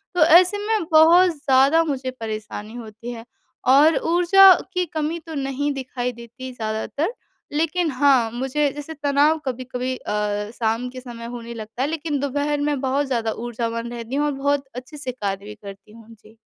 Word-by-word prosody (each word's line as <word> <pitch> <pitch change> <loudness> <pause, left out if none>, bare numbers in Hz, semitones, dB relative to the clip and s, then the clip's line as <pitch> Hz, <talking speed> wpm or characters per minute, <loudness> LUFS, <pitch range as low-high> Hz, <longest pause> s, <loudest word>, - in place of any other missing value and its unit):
तो 345 - +5
ऐसे 355 +5 +6
में 440 -4 +1
बहुत 330 +4 +7
ज़्यादा 285 +1 +3
मुझे 270 -4 -3
परेशानी 215 -1 -6
होती 230 0 -8
है 230 -1 -8 0.5
और 300 +3 +6 0.2
ऊर्जा 370 +2 +7 0.2
की 360 -1 0
कमी 315 +2 -2
तो 325 - -7
नहीं 275 +1 -2
दिखाई 255 -2 -4
देती 240 +2 -10
ज़्यादातर 225 - -3 0.4
लेकिन 325 +2 0
हाँ, 260 -4 +3
मुझे 270 +4 0
जैसे 295 +2 -7
तनाव 290 +3 +3
कभी-कभी 255 0 -3
अ, 210 0 -3
शाम 230 +2 -1
के 255 +1 -9
समय 235 -2 -9
होने 235 0 -7
लगता 225 +2 -7
है। 270 - +1
लेकिन 310 -2 -2
दोपहर 285 +2 -1
में 290 -1 0
बहुत 275 +2 0
ज़्यादा 230 -4 -1 0.2
ऊर्जावान 230 0 -4
रहती 235 +2 -6
हूँ 295 +1 +1
और 295 - 0
बहुत 280 0 -1
अच्छे 255 +5 -9
से 260 -3 -4
कार्य 200 -5 -4
भी 210 0 -9
करती 200 -1 -12
हूँ। 225 0 -15
जी। 220 0 -20
260 Hz, 175 wpm, -22 LUFS, 230-295 Hz, 0.5 s, बहुत